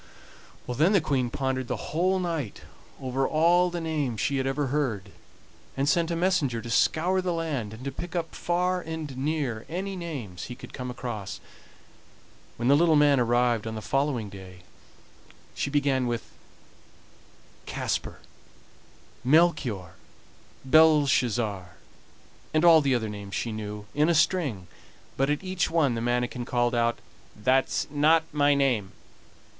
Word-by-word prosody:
Then 150 - +2
the 195 - +5
Queen 135 -6 0
pondered 130 0 -2
the - - -5
whole 185 +4 +2
night 165 - -3 0.4
over 130 0 -1
all 175 +3 +3
the 175 0 -4
names 150 -8 -2
she 140 - 0
had 135 0 -1
ever 140 +2 0
heard, 110 -10 -1 0.7
and 135 +1 0
sent 165 +3 +2
a 170 - -1
messenger 165 -9 +1
to 115 +1 -7
scour 180 +9 +2
the 180 -1 -1
land, 155 -10 -2
and 115 +4 -10
to 140 - -2
pick 175 +6 -7
up 165 -2 -2
far 180 +1 0
and 160 -4 -6
near 135 -5 -2
any 190 +4 -4
names 140 - -6
he 125 - -7
could - - -12
come 125 -1 -5
across. 120 -5 -5 1.2
When 120 - -1
the 140 - +6
little 165 +1 +4
man 145 -2 +5
arrived 120 -2 +2
on 110 - -4
the - - -4
following 135 -5 0
day 95 -2 -12 0.9
she - - -2
began 140 -3 +1
with 120 -1 -4 1.4
Kasper, - - -3 1.0
Melchior, 130 - +2 0.7
Belshazzar, 130 - +3 0.8
and 155 +2 +3
all 165 -2 +8
the 135 -3 +2
other 110 -3 -2
names 100 -1 -7
she 115 - -2
knew, 105 -1 -6
in 150 +3 +2
a 170 - +3
string, 150 - +1 0.5
but 135 +1 +1
at 150 +5 -1
each 185 -1 -1
one 155 -6 +2
the 115 - -3
manikin 120 +1 -1
called 120 0 0
out: 120 0 +1 0.5
"That's 130 +3 +2
not 155 +3 +4
my 145 -1 +3
name." 125 -8 +1
135 Hz, 150 wpm, -27 LUFS, 120-160 Hz, 1.4 s, all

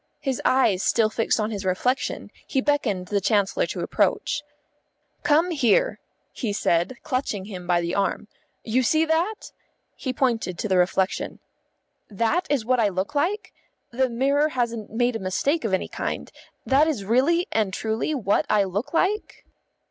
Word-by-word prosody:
His 270 -3 -2
eyes 225 -8 +3
still 220 0 +2
fixed 225 +1 +1
on 215 +1 -1
his 205 -2 -4
reflection, 220 +9 -1 0.2
he 270 - 0
beckoned 230 -10 0
the 205 -1 +1
Chancellor 200 -1 +1
to - - -4
approach. 295 - 0 0.8
"Come 320 +4 +3
here," 330 - +2 0.3
he 220 -5 -3
said, 175 +3 +1
clutching 255 -9 -2
him 185 -4 -8
by 175 -1 +3
the 170 +1 -2
arm. 200 +1 -1 0.4
"You 235 +3 +1
see 315 +6 +3
that?" 335 +7 -1 0.4
He 260 - -3
pointed 235 -8 0
to 215 - -2
the 190 -2 +3
reflection. 185 +1 0 0.7
"That 230 - 0
is 275 -6 0
what 255 +1 +2
I 215 -3 +3
look 190 +7 -3
like? 350 +9 -1 0.4
The 260 +2 +1
mirror 280 +5 +2
hasn't 235 -5 -2
made 240 +2 0
a - - -2
mistake 260 - 0
of 220 - -1
any 190 - 0
kind? - - -4 0.3
That 280 +4 +4
is 250 -11 -2
really 280 - +2
and 215 -3 +1
truly 220 +9 -2
what 210 -6 +1
I 210 -1 +4
look 200 - -3
like?" 405 +5 0
235 Hz, 165 wpm, -24 LUFS, 200-285 Hz, 0.8 s, That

